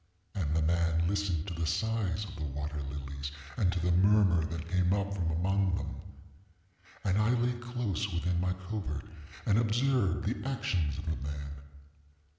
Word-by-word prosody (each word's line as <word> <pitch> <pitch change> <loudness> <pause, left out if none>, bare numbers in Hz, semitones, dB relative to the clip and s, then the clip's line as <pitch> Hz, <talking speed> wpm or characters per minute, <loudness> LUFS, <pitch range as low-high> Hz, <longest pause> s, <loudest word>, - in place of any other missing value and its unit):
And 80 -7 -1
the 80 - +3
man 85 0 +2
listened 95 -4 0
to 95 - -4
the 85 -1 -1
sighs 105 +1 0
of - - -9
the 75 - -5
water 75 +1 -3
lilies, 70 0 -5 0.2
and 90 +2 +3
to 90 - -1
the 90 +1 +2
murmur 95 -2 +5
that 80 0 -4
came 90 0 +2
up 100 0 0
from 90 -4 0
among 95 +3 +2
them. - - -4 1.1
And 100 0 +2
I 105 +1 +3
lay 120 +1 +2
close 120 -4 -2
within 85 0 0
my 90 0 +1
covert 90 -8 -3 0.4
and 105 0 +4
observed 115 -4 +2
the 125 +5 -1
actions 90 - 0
of 80 - -5
the 80 -1 -1
man. 70 +1 -5
90 Hz, 170 wpm, -31 LUFS, 80-100 Hz, 1.1 s, murmur